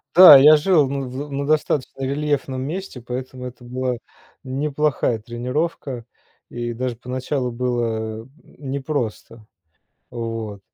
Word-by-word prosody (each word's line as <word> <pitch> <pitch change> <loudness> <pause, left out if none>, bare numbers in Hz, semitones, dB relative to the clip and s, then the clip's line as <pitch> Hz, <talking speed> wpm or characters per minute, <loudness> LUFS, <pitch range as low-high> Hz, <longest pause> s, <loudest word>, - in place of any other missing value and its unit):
Да, 175 -6 +12
я 150 +3 +8
жил 155 -3 +3
на, 140 0 -2
в 140 +3 -6
на 140 +1 -2
достаточно 145 -3 0
рельефном 140 -1 -1
месте, 155 -2 -5
поэтому 125 +1 -6
это 125 0 -9
была 125 0 -2 0.5
неплохая 135 -3 0
тренировка. 125 +2 -3 0.4
И 120 0 -4
даже 125 0 -3
поначалу 125 +1 -3
было 115 -3 -2
н 125 - -16 0.4
непросто. 125 -6 -4 0.7
Вот. 115 -4 -5
130 Hz, 115 wpm, -22 LUFS, 120-145 Hz, 0.7 s, Да